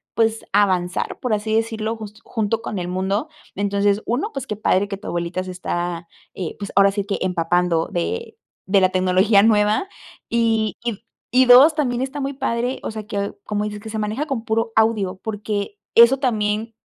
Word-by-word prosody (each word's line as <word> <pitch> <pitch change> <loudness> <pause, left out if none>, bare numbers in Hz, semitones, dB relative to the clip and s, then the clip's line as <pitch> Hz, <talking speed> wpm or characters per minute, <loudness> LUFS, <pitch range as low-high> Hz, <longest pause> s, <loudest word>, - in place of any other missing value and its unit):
pues, 225 -1 +1
avanzar, 185 -3 +1
por 250 -3 -1
así 215 +1 -1
decirlo, 225 0 -1
just 215 0 -10
junto 220 0 -1
con 210 -4 -4
el 175 - -4
mundo. 190 - -1 0.3
Entonces, 200 +1 +1
1, 285 - -1
pues, 265 -1 -5
qué 210 - -3
padre 205 -1 +1
que 200 -1 -5
tu - - -11
abuelita 175 +1 -2
se 185 - -7
está, 175 -1 -3 0.3
eh, 180 -4 -5
pues, 200 -1 -5
ahora 200 0 +6
sí 200 0 -3
que, 200 - -2
empapando 175 -1 +1
de 455 - -3 0.3
de 195 0 +4
la 185 - +4
tecnología 185 +3 +3
nueva. 210 - +3 0.4
Y 225 -2 +1
y 235 -4 -3 0.3
y, 255 +2 +4
2, 260 +6 +8
también 250 -5 0
está 270 +2 -3
muy 275 0 -2
padre, 245 -1 -2
o - - -3
sea, 215 -1 -7
que 200 -1 -3
como 210 -1 -2
dices 210 0 -5
que 220 - -8
se 220 0 -4
maneja 215 +7 -2
con 250 -6 -3
puro 225 0 0
audio, 215 -4 +2
porque 210 -1 -4 0.2
eso 235 +3 +7
también 220 -3 -1
210 Hz, 190 wpm, -21 LUFS, 195-230 Hz, 0.4 s, 2